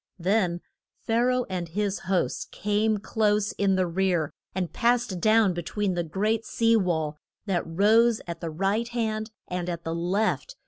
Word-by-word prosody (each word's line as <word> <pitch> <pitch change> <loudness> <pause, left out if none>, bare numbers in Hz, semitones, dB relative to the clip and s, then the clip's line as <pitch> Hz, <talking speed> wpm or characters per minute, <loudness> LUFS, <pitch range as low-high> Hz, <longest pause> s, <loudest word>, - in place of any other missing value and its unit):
Then 180 -1 +1 0.4
Pha 225 +1 +1
ra 255 0 +2
oh 250 - 0
and 180 -3 -4
his 205 +2 -1
hosts 185 -1 0
came 210 +1 0
close 210 0 +1
in 195 -1 +1
the 185 -1 +2
rear, 175 -3 0 0.2
and 180 -3 -2
passed 235 -6 +1
down 215 -2 +4
be 175 - -3
tween 200 +3 -1
the 175 - 0
great 210 +7 0
sea 230 0 +2
wall 160 -7 0 0.3
that 190 -4 0
rose 220 +7 +4
at 170 -1 -6
the 165 - -3
right 195 +8 0
hand 220 -2 -2 0.2
and 180 0 -3
at 170 -1 -4
the 165 - -3
left. 200 - -1
195 Hz, 175 wpm, -26 LUFS, 175-220 Hz, 0.4 s, down